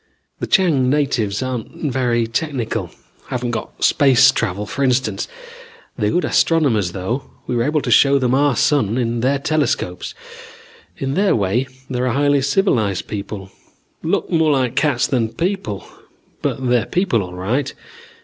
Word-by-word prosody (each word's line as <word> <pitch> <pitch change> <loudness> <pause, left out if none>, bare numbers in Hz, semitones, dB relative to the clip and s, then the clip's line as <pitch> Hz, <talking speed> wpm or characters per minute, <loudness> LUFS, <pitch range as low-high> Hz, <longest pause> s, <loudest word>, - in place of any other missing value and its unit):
"The - - -3
Chang 160 -10 +3
natives 130 -7 0
aren't 130 +3 -4
very 120 -2 +1
technical 125 0 -2 0.4
haven't 125 -1 -2
got 120 - -5
space 135 -1 +5
travel 100 -4 -2
for 140 +6 -3
instance. 130 0 0 0.7
They're 105 -4 0
good 180 - +1
astronomers, 120 - +2
though. 115 +8 -3 0.2
We 125 - -2
were 120 - +1
able 150 +4 +1
to - - -2
show 140 0 +6
them 125 -2 +1
our 140 -1 +3
sun, 130 -7 +2
in 120 -1 -1
their 135 +4 +2
telescopes. 140 - -1 0.8
In 135 0 -2
their 195 +4 +2
way, 110 +6 0 0.2
they're 125 -1 -1
a 120 - 0
highly 145 +1 +2
civilized 135 - +1
people. 100 -1 -6 0.5
Look - - -1
more 160 -2 +3
like 130 -2 0
cats 140 -3 +2
than 115 -4 0
people, 170 - -2 0.6
but 130 - -2
they're 120 -3 +2
people 180 - +1
all 90 -1 -7
right. 115 +10 -1
130 Hz, 150 wpm, -19 LUFS, 115-145 Hz, 0.8 s, show